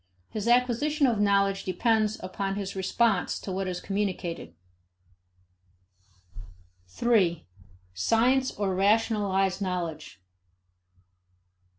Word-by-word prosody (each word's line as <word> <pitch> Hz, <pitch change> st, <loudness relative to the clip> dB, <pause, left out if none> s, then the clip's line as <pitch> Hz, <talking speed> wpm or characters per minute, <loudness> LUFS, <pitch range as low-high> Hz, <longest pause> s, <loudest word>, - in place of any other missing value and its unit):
His 215 Hz, 0 st, -4 dB
acquisition 250 Hz, +5 st, +2 dB
of 235 Hz, -5 st, +1 dB
knowledge 200 Hz, -1 st, +2 dB
depends 215 Hz, +3 st, +1 dB
upon 195 Hz, +1 st, -3 dB
his 200 Hz, -1 st, -5 dB
response 195 Hz, +1 st, +1 dB
to 195 Hz, -, -7 dB
what 190 Hz, +1 st, -2 dB
is 180 Hz, -1 st, -3 dB
communicated. 185 Hz, -, -3 dB, 2.3 s
3. 175 Hz, -, +1 dB, 0.5 s
Science 245 Hz, -, +2 dB
or 200 Hz, -2 st, -2 dB
Rationalized 200 Hz, -1 st, +1 dB
Knowledge. 170 Hz, -, -4 dB
200 Hz, 85 wpm, -27 LUFS, 185-225 Hz, 2.3 s, acquisition